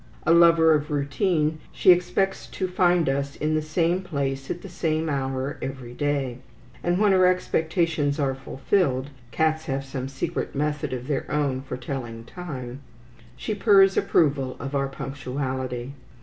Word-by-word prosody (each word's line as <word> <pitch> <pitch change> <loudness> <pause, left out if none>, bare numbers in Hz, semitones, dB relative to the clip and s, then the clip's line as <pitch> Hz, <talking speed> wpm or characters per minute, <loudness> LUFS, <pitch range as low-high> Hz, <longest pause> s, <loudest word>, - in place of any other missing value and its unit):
A 165 - +5
lover 165 -1 +6
of 150 -1 0
routine, 155 +2 0
she - - +5
expects 180 +2 +1
to 185 - -3
find 180 -2 +2
us 140 +1 -1
in 155 +1 -1
the 155 - +1
same 165 +3 0
place 135 -6 -3
at 175 - -4
the - - -7
same 160 -3 -1
hour 135 -1 -2
every 130 -3 -6
day; 140 -3 -1 0.4
and 175 +1 +1
when 205 0 +4
her 185 -1 +5
expectations 160 -4 0
are 135 -2 +1
fulfilled 135 +1 -1 0.2
(cats 160 +3 0
have 135 0 -2
some 135 -1 -4
secret 140 +5 -4
method 150 +1 -1
of 125 -1 -4
their 140 -1 -2
own 140 -3 0
for 135 - -6
telling 120 -3 -5
time), 130 -6 -7 0.6
she 215 - -3
purrs 195 -2 +5
approval 140 -5 +2
of 140 0 -5
our 140 -1 +1
punctuality. 130 -2 -4
145 Hz, 155 wpm, -25 LUFS, 135-170 Hz, 0.6 s, lover